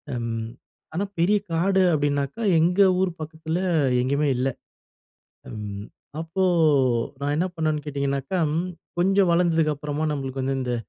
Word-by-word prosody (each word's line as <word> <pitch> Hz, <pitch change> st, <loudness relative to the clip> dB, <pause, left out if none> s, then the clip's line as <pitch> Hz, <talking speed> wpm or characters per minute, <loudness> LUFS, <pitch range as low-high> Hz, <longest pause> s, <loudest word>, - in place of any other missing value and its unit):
ம். 115 Hz, -1 st, -3 dB, 0.4 s
ஆனா, 190 Hz, +5 st, -1 dB, 0.2 s
பெரிய 205 Hz, +5 st, +4 dB
காடு 190 Hz, +4 st, +2 dB
அப்படினாக்க 145 Hz, 0 st, 0 dB, 0.2 s
எங்க 180 Hz, +4 st, +3 dB, 0.2 s
ஊர் 190 Hz, -2 st, +1 dB
பக்கத்தில 160 Hz, +2 st, -4 dB, 0.4 s
எங்கயுமே 140 Hz, +3 st, +1 dB
இல்ல. 130 Hz, +2 st, +1 dB, 1.0 s
ம். 105 Hz, -2 st, -6 dB, 0.4 s
அப்போ, 165 Hz, +4 st, -1 dB, 0.8 s
நான் 145 Hz, +1 st, 0 dB
என்ன 180 Hz, +3 st, +1 dB
பண்ணுனேனு 155 Hz, -2 st, -1 dB
கேட்டிங்கனாக்க 140 Hz, +4 st, -1 dB, 0.6 s
கொஞ்சம் 190 Hz, 0 st, +3 dB
வளந்ததுக்கு 165 Hz, -3 st, +2 dB
அப்புறமா 150 Hz, +1 st, -3 dB
நம்மளுக்கு 135 Hz, -2 st, -4 dB
வந்து 135 Hz, +1 st, -1 dB
இந்த 125 Hz, -1 st, -2 dB
150 Hz, 120 wpm, -24 LUFS, 135-170 Hz, 1.0 s, பெரிய